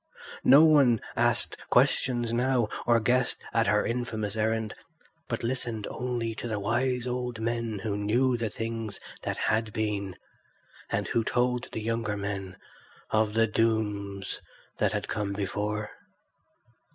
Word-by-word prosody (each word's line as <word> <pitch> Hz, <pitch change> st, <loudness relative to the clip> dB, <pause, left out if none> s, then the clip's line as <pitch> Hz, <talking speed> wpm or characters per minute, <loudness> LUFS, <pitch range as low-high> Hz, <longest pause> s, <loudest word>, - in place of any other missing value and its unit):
No 140 Hz, +4 st, +8 dB
one 140 Hz, -8 st, +6 dB, 0.2 s
asked -, -, +2 dB
questions 120 Hz, -2 st, +2 dB
now 120 Hz, -2 st, +2 dB, 0.2 s
or 120 Hz, -1 st, +5 dB
guessed 125 Hz, +2 st, +2 dB, 0.2 s
at 115 Hz, -1 st, +3 dB
her 105 Hz, 0 st, +3 dB
infamous 115 Hz, -4 st, -2 dB
errand, 110 Hz, 0 st, 0 dB, 0.5 s
but 120 Hz, -3 st, -3 dB
listened 115 Hz, -3 st, -2 dB
only 120 Hz, -2 st, -2 dB
to -, -, -4 dB
the 110 Hz, -3 st, -2 dB
wise 120 Hz, +4 st, 0 dB
old 125 Hz, -2 st, -3 dB
men 115 Hz, -1 st, -1 dB
who 105 Hz, -2 st, -1 dB
knew 120 Hz, +5 st, +2 dB
the 115 Hz, -2 st, -1 dB
things 115 Hz, -1 st, -4 dB, 0.2 s
that -, -, -3 dB
had 110 Hz, 0 st, +1 dB
been, 100 Hz, -4 st, -2 dB, 0.7 s
and -, -, -1 dB
who 115 Hz, -, +1 dB
told 125 Hz, +1 st, 0 dB
the 110 Hz, -, -4 dB
younger 115 Hz, -2 st, -1 dB
men 95 Hz, -2 st, -4 dB, 0.5 s
of 110 Hz, -1 st, +2 dB
the 115 Hz, 0 st, +5 dB
dooms 105 Hz, -3 st, -1 dB, 0.4 s
that -, -, +2 dB
had -, -, -2 dB
come 105 Hz, -2 st, -2 dB
before. 105 Hz, +1 st, -2 dB
115 Hz, 140 wpm, -28 LUFS, 105-120 Hz, 0.7 s, No